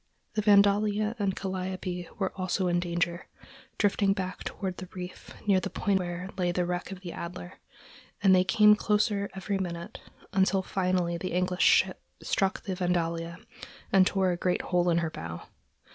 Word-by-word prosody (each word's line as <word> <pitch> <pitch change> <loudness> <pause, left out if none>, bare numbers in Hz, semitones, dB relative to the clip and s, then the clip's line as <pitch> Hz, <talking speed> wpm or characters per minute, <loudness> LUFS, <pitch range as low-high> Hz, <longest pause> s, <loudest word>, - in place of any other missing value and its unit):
The 215 - 0
Vandalia 205 +1 +4
and 195 -2 0
Calliope 185 -2 -4
were 195 -2 -1
also 185 0 -1
in 175 0 +2
danger, 175 0 -2 0.5
drifting 200 -1 +2
back 185 -1 -4
toward 190 -3 -4
the 185 -1 -8
reef 180 0 -8 0.2
near 195 -2 +4
the 195 - -4
point 195 +1 +1
where 180 +1 -4
lay 175 -1 +2
the 180 0 0
wreck 180 +2 -3
of 190 -1 -8
the 175 -3 -6
Adler; 170 - -7 0.6
and 190 -1 +6
they 185 0 +5
came 210 +2 +6
closer 210 -1 +1
together - - -23
every 195 +1 -2
minute, 175 +2 -5 0.3
until 190 0 +2
finally 180 -2 0
the 185 - -4
English 180 0 0
ship - - +4 0.2
struck 195 0 0
the 190 - -3
Vandalia 170 -2 -1 0.6
and 190 -1 +6
tore 190 -2 +2
a 175 - -2
great 180 0 0
hole 180 -1 +1
in 170 - +3
her 160 - -3
bow. 85 - -7
185 Hz, 175 wpm, -28 LUFS, 175-195 Hz, 0.6 s, and